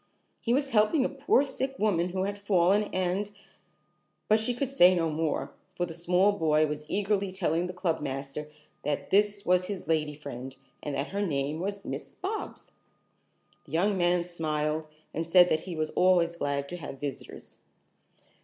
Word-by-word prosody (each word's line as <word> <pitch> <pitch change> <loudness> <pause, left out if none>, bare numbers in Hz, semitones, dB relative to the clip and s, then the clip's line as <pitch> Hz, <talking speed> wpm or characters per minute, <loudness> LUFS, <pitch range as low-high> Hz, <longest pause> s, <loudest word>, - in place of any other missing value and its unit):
He 235 - -2
was 275 +2 +1
helping 230 +6 +3
a - - 0
poor 275 0 +2
sick 270 -1 -3
woman 180 -5 +1
who 185 +1 -2
had 200 +1 -3
fallen, 200 +1 +3
and 185 +2 -1 0.5
" - - -45
But 215 +1 +5
she 235 +3 -1
could 270 +1 -2
say 185 -9 +6
no 165 -2 +1
more, 155 0 -2 0.2
for 175 - 0
the 170 - -8
small 180 +4 +3
boy 155 -5 +2
was 150 0 -5
eagerly 200 -1 0
telling 180 -2 0
the 180 - -6
clubmaster 150 -4 -3 0.3
that 145 -1 -3
this 205 0 +3
was 180 0 +3
his 195 -1 -5
"lady 155 -2 0
friend" 135 -3 -8 0.3
and 145 -2 -4
that 140 +2 -2
her 200 +1 -2
name 145 -3 -1
was 200 +2 -4
Miss - - -6
Bobs. 405 +4 -5 0.9
The 150 - -15
young 195 +5 +2
man 175 -1 +2
smiled 155 -2 -2 0.3
and 165 +2 -3
said 180 +1 +7
that 155 0 0
he 175 - -4
was 155 0 -2
always 175 -2 +3
glad 140 -3 -2
to 175 - -5
have 145 -4 -8
visitors. 145 -2 -7
175 Hz, 175 wpm, -28 LUFS, 155-200 Hz, 0.9 s, said